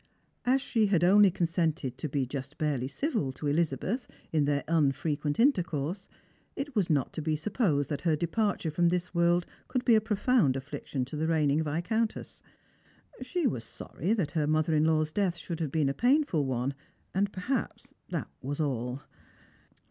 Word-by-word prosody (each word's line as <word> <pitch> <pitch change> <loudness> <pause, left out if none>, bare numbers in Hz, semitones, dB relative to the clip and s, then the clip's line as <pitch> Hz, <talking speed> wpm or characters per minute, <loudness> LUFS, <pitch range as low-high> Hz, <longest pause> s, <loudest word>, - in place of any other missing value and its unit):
As 260 +2 +3
she 220 -3 +2
had 180 -4 +2
only 200 +3 +7
consented 165 -6 -1
to 155 - -3
be 135 -1 0
just 135 +2 -6
barely 140 -5 0
civil 215 - -1
to 150 - -8
Elizabeth 165 - 0 0.2
in 155 -3 +2
their 145 0 +1
unfrequent 150 0 0
intercourse, 180 - +1 0.5
it 275 -1 -5
was 195 -5 +1
not 145 -5 +1
to - - -4
be 155 0 0
supposed 155 - 0
that 145 - -2
hei 165 -3 +2
departure 175 +1 0
from 170 +3 +3
this 180 +1 -2
world 170 0 +3 0.2
could 255 -1 -2
be 240 - +6
a 220 - +5
profound 210 - +2
affliction 135 -1 -4
to 135 - -8
the 155 +2 -1
reigning 155 -2 +2
Viscountess. 180 +9 -2 0.8
She 285 +6 -2
was 125 - 0
sorry 175 - -3
that 195 -10 -1
her 155 -3 0
mother 155 +1 +2
in 155 0 +3
law's 155 -1 +2
death 185 -2 0
should 170 +1 -6
have 155 -5 -2
been 155 -2 +2
a 135 - +1
painful 245 - +2
one, 130 +1 -1 0.4
and 200 +1 +1
perhaps 240 +9 -3 0.2
that - - -3
was 140 +3 -4
all. 130 -3 -2
160 Hz, 170 wpm, -29 LUFS, 145-200 Hz, 0.8 s, only